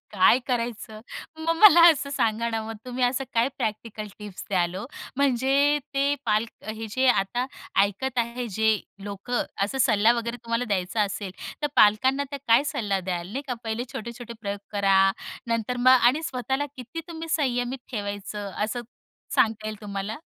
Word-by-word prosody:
काय 195 +5 +5
करायचं? 230 -3 -3 0.4
मग 320 +1 -1
मला 345 -3 +9
असं 280 -3 -2
सांगा 230 -3 0
ना, 225 -1 -2
मग 225 0 -6
तुम्ही 250 0 -1
असं 250 +2 0
काय 230 +3 +3
प्रॅक्टिकल 215 0 -3
टिप्स 210 -3 -8
द्याल 180 -3 +1
हो? 195 +5 -4 0.3
म्हणजे 280 +2 +3 0.2
ते 280 +1 +2
पालक 215 +1 +1 0.2
हे 225 0 -6
जे 260 +4 +1
आता 240 +2 +1 0.4
ऐकत 205 +6 -1
आहे, 240 +1 -1
जे 220 +1 +2 0.2
लोकं, 205 +5 -2 0.2
असा 265 +7 -4
सल्ला 225 -3 +5
वगैरे 235 0 -3
तुम्हाला 230 +1 0
द्यायचा 200 -1 0
असेल, 200 -1 -3 0.3
तर - - +3
पालकांना 260 +7 +4
त्या 280 - -4
काय 235 +5 +6
सल्ला 200 -4 -1
द्याल? 175 -1 -4
नाही 275 +4 -3
का, 250 - -2
पहिले 225 +2 -2
छोटे-छोटे 235 +1 -7
प्रयोग 200 -1 -3
करा, 195 -2 +4 0.5
नंतर 230 +1 -1
मग 250 +1 +5 0.2
आणि 300 +5 -4
स्वतःला 265 0 -2
किती 255 +6 -6
तुम्ही 330 -1 -7
संयमित 255 -4 0
ठेवायचं? 205 -2 -4
असं 225 +3 -3 0.5
सांगता 220 -1 +2
येईल 215 -1 -5
तुम्हाला. 205 +4 -5
230 Hz, 160 wpm, -25 LUFS, 210-255 Hz, 0.5 s, मला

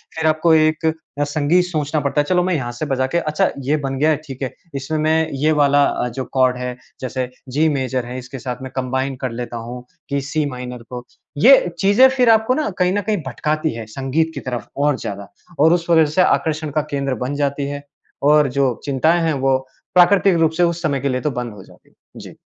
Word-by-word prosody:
फ़िर 160 0 0
आपको 155 +1 +3
एक 155 +1 +2
अ, 160 -2 -2
संगीत 150 +4 +1
सोचना 155 -3 -1
पड़ता 145 +1 +1
है। - - -3
चलो 180 -1 +3
मैं 185 0 0
यहाँ 120 -5 -3
से 120 +6 -5
बजा 130 -2 0
के, 150 - -1
अच्छा 155 -2 0 0.2
ये 150 +3 +2
बन 135 -2 -3
गया 155 +2 +3
है, 155 - +2
ठीक 135 -2 -9
है 130 - -3 0.2
इसमें 140 +3 -3
मैं 160 +1 +2
ये 155 +1 +3
वाला 145 0 +4
अ, 125 - -1
जो 130 +2 -5
कॉर्ड 130 -1 +3
है 125 0 -4 0.3
जैसे 130 -1 -3 0.2
जी 150 +5 +2
मेजर 130 -3 -1
है 125 +1 -6
इसके 130 +1 -9
साथ 125 +1 -5
मैं 130 - -7
कंबाइन 130 +1 -1
कर 130 -2 -2
लेता 120 0 -5
हूँ 120 +2 -7 0.3
कि 140 0 -1
सी 150 +3 -1
माइनर 125 -1 -7
को। 125 -1 -6 0.3
ये 260 - +6
चीज़ें 205 +8 +6
फ़िर 255 -2 +2
आपको 220 +2 +4
ना 305 -1 -1
कहीं 180 0 +2
ना 205 - 0
कहीं 210 +1 -1
भटकाती 155 +5 -1
है 115 -1 -6
संगीत 135 +7 -1
की - - -3
तरफ 120 -4 -5
और 145 -1 +2
ज़्यादा 100 0 -6 0.3
और 160 +3 +5
उस 175 -1 -1
वजह 160 -2 +5
से - - +6
आकर्षण 155 -3 +1
का 155 +2 +1
केंद्र 140 -2 -1
बन 140 +3 -3
जाती 140 0 -1
है। 145 0 -5 0.5
और 150 -1 +5
जो 135 -3 +3
चिंताएँ 155 +5 +2
हैं 160 - +1
वो 135 -1 +4 0.4
प्राकृतिक 185 0 +5
रूप 160 -1 +3
से 175 - +3
उस 170 0 0
समय 140 -4 0
के 140 - 0
लिए 130 -1 -1
तो 150 - -1
बंद 120 -3 -5
हो 100 -2 -12
जाती - - -20
हैं। - - -34 0.3
जी। - - -11
145 Hz, 230 wpm, -19 LUFS, 130-160 Hz, 0.5 s, ये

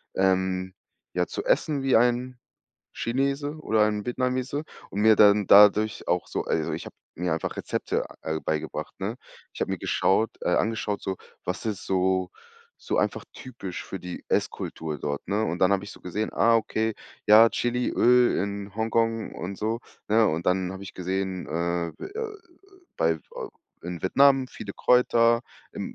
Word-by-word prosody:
ähm, 95 -1 +1 0.4
ja, 90 0 +1
zu - - -5
essen 145 -3 +1
wie 135 -1 +3
ein 125 +1 +1 0.5
Chinese 140 +4 -1
oder 110 -6 +2
ein 105 -1 -1
Vietnamese 130 +4 -1 0.3
und 100 - -3
mir 110 -1 +6
dann 105 -1 +6
dadurch 105 +1 +6
auch 90 0 +1
so - - -3
also, - - -1
ich - - -5
habe - - -11 0.2
mir 90 0 -1
einfach 80 - -4
Rezepte - - -2 0.2
al 80 0 -2
beigebracht, 75 -1 -3
ne? - - -3 0.4
Ich - - -11
habe - - -1
mir - - -3
geschaut 110 +4 +1
äh, - - 0
angeschaut 110 -2 -1
so, 95 -1 -3 0.3
was 90 +5 -4
ist 105 -3 -3
so 95 0 +1 0.5
so - - -2
einfach - - 0
typisch 115 -8 -7
für 95 - -7
die 90 0 -7
Esskultur 75 -2 -2
dort, 70 -1 -4
ne? 105 +3 +1
Und 85 -2 -2
dann 95 - +4
habe 100 0 +1
ich 100 - -9
so - - -15
gesehen, 105 +4 -3
ah, 115 0 +4
okay, 110 -1 -1 0.3
ja, 110 +2 +8
Chiliöl 125 0 +3
in 100 0 -5
Hongkong 115 0 0
und 95 +2 -5
so, 110 +2 -1 0.3
ne, 110 +1 +4
und 80 +2 -2
dann 90 0 +1
habe 95 - -8
ich 100 - -9
gesehen, 95 0 -3
äh, 85 +1 -2 1.0
bei 80 0 +1
v - - -9 0.3
in 85 -1 -6
Vietnam 135 +6 +4
viele 100 -5 -8
Kräuter, 120 -1 +4 0.3
im - - -6
105 Hz, 165 wpm, -26 LUFS, 95-115 Hz, 1.0 s, ja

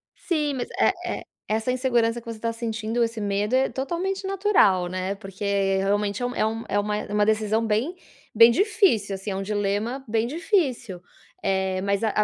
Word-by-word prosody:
Sim, 300 -5 -1
mas, 245 - -3
é - - +4 0.3
é - - -11 0.2
essa 220 +3 0
insegurança 240 -2 +1
que 235 - -19
você 230 -2 -7
tá 230 0 -1
sentindo, 230 0 -2
esse 230 -1 -2
medo, 205 +3 -1
é 265 +1 +3
totalmente 360 +8 -3
natural, 380 - +3
né. 185 +2 -2
Porque 195 0 -9 0.3
realmente 205 +3 0
é - - +1
um 245 - -3
é 215 - +1
um 225 +1 -4
é 205 - +2
uma 210 0 -1
é 210 - -5
uma 210 0 +3
decisão 220 +1 +1
bem 225 - 0 0.4
bem 230 +1 +8
difícil, 345 - +2
assim, 195 +2 -6
é - - -3
um 195 - -2
dilema 210 +6 -1
bem 225 +1 +1
difícil. 260 - -1 0.4
Eh, 190 -1 0
mas 200 +2 0
a 220 - +2
220 Hz, 190 wpm, -24 LUFS, 205-255 Hz, 0.4 s, bem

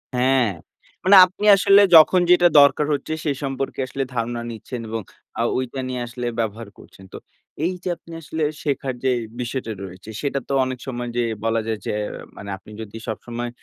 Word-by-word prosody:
হ্যাঁ। 125 -2 +3 0.5
মানে 190 +2 +6
আপনি 185 +3 -6
আসলে 195 +1 +6
যখন 165 +3 +8
যেটা 175 0 +6
দরকার 140 +1 +4
হচ্ছে 145 +2 -3
সে 150 - 0
সম্পর্কে 135 0 -3
আসলে 135 +1 -3
ধারণা 120 0 -2
নিচ্ছেন 115 +2 -7
এবং 115 0 -3 0.4
আ - - +2
ঐটা 130 +1 -3
নিয়ে 125 -1 -3
আসলে 120 +1 -6
ব্যবহার 110 0 -3
করছেন। 95 - -16
তো - - -6 0.5
এই 185 - 0
যে - - -2
আপনি 170 - -16
আসলে 160 +1 -4 0.2
শেখার 140 -2 -1
যেই 130 -2 +2 0.2
বিষয়টা 120 -1 -4
রয়েছে 95 +3 -10
সেটা 140 -1 -1
তো - - -2
অনেক 130 -1 -5
সময় 120 -1 -4
যে 120 - +2 0.2
বলা 115 0 +1
যায় 110 -2 -2
যে - - -2 0.4
মানে 100 0 -9
আপনি 100 +3 -16
যদি 110 0 -8
সবসময় 120 +2 -5
125 Hz, 180 wpm, -22 LUFS, 115-140 Hz, 0.5 s, যখন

